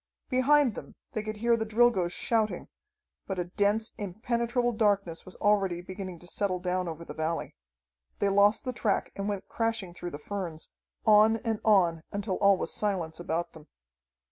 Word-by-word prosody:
Behind 265 0 +4
them - - -9 0.2
they 215 - -2
could 215 0 -5
hear 235 +2 +3
the 225 - -1
Drilgoes 220 -5 +3
shouting, 220 +2 0 0.6
but 195 - -3
a 180 - 0
dense, 205 +5 0
impenetrable 235 +4 -1
darkness 200 -7 0
was 185 - -10
already 195 -4 +2
beginning 185 0 -7
to 175 - -13
settle 185 +1 -1
down 180 0 -1
over 165 0 -6
the - - -7
valley. 160 +1 -3 0.6
They 200 - +1
lost 205 +4 +4
the 255 - -2
track 215 -4 0
and 200 +1 -3
went 200 -2 -4
crashing 225 -6 -2
through 175 0 -6
the 145 - -7
ferns, 170 -1 -5 0.4
on 215 +1 +6
and 225 -2 0
on 175 -6 +4
until 200 -2 -2
all 200 -1 +5
was - - -3
silence 175 -6 -1
about 170 0 -2
them. 155 -2 -14
200 Hz, 170 wpm, -29 LUFS, 175-220 Hz, 0.6 s, on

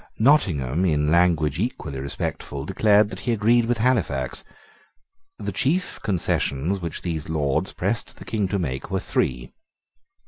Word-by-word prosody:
Nottingham, 90 - +3
in 75 -3 +2
language 85 -3 +3
equally 80 - -3
respectful, 70 0 -4
declared 105 +3 +4
that - - -7
he 120 - -1
agreed 115 +2 +3
with 120 0 +1
Halifax. 125 +4 0 0.9
The - - -4
chief 175 +7 0
concessions 90 -2 0
which 85 -2 -5
these 80 -3 -3
Lords 75 -4 0
pressed - - -2
the - - -11
King 105 -3 -1
to 100 - -1
make 65 -7 -3
were - - 0
three. 65 0 -2
85 Hz, 140 wpm, -24 LUFS, 75-110 Hz, 0.9 s, declared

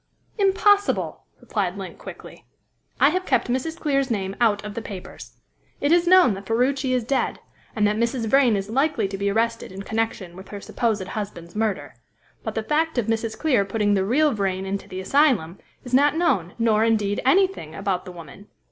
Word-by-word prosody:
"Impossible!" 405 +1 +2
replied 200 -3 -2
Link 195 -2 -8
quickly. - - -11 0.6
"I 275 +2 +6
have 370 +4 -1
kept 370 - 0
Mrs. 290 +6 -2
Clear's 275 -3 0
name 195 -4 -2
out 210 -3 +2
of 210 - -6
the 230 - -4
papers. 195 -4 -10 0.4
It 285 - +1
is 345 0 +4
known 365 - +6
that 195 0 -8
Ferruci 260 +3 +1
is 250 -2 +1
dead, 270 +4 -1 0.4
and 210 -2 +2
that 210 +1 +1
Mrs. 235 +1 0
Vrain 250 -1 +4
is 195 0 -3
likely 265 -2 +1
to 195 - -6
be 200 +1 -1
arrested 230 +1 -1
in 195 +1 -7
connection 220 -5 -3
with 190 +1 -11
her 205 - -7
supposed 210 -2 -1
husband's 185 -5 -6
murder. 215 -2 -2 0.5
But - - -5
the 220 - -1
fact 315 +4 0
of 240 - +1
Mrs. 225 0 -2
Clear 260 -10 +2
putting 205 +1 0
the 195 -1 +2
real 280 +8 +2
Vrain 190 -2 -2
into 195 +1 -4
the 185 - -5
asylum 195 - +2 0.2
is 245 - -10
not 285 +3 +4
known, 215 - +1
nor, 225 -2 +2
indeed, 210 -3 +1
anything 300 - +2
about 195 -2 -2
the 185 - -8
woman. 175 +3 -12
225 Hz, 190 wpm, -23 LUFS, 195-270 Hz, 0.6 s, I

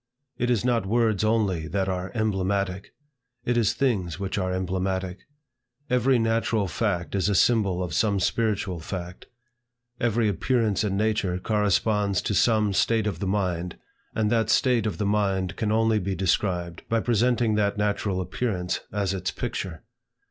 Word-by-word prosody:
It 120 - 0
is 120 -2 +1
not 115 -5 +1
words 110 -1 +2
only 105 -7 +1
that 95 +3 -1
are 90 0 -3
emblematic; 100 -3 -1 0.5
it 120 - +1
is 115 -4 +2
things 100 -11 0
which 95 -1 -3
are 95 -1 -1
emblematic. 95 0 -2 0.7
Every 125 +1 +3
natural 115 -2 +1
fact 90 -2 -2
is 100 0 +1
a 100 - +1
symbol 100 -4 +3
of 85 -3 -5
some 100 +2 +2
spiritual 95 -2 0
fact. 90 +2 -7 0.7
Every 115 -1 +1
appearance 110 +1 +1
in 100 -2 -1
nature 105 -4 0
corresponds 105 -1 +1
to - - -1
some 105 -1 +3
state 110 +2 +2
of 100 -6 -2
the 100 - -2
mind, 90 -3 -1 0.4
and 110 -1 +1
that 115 -2 +2
state 120 -4 +3
of 95 -6 -3
the 105 - -1
mind 95 -3 0
can 105 -1 -1
only 110 0 +3
be 95 0 -2
described 90 -1 -1
by 115 - +2
presenting 120 0 +2
that 105 -1 +1
natural 100 -2 0
appearance 90 -2 -2
as 100 -2 -1
its 95 -1 -2
picture. 80 +1 -5
100 Hz, 155 wpm, -25 LUFS, 95-110 Hz, 0.7 s, Every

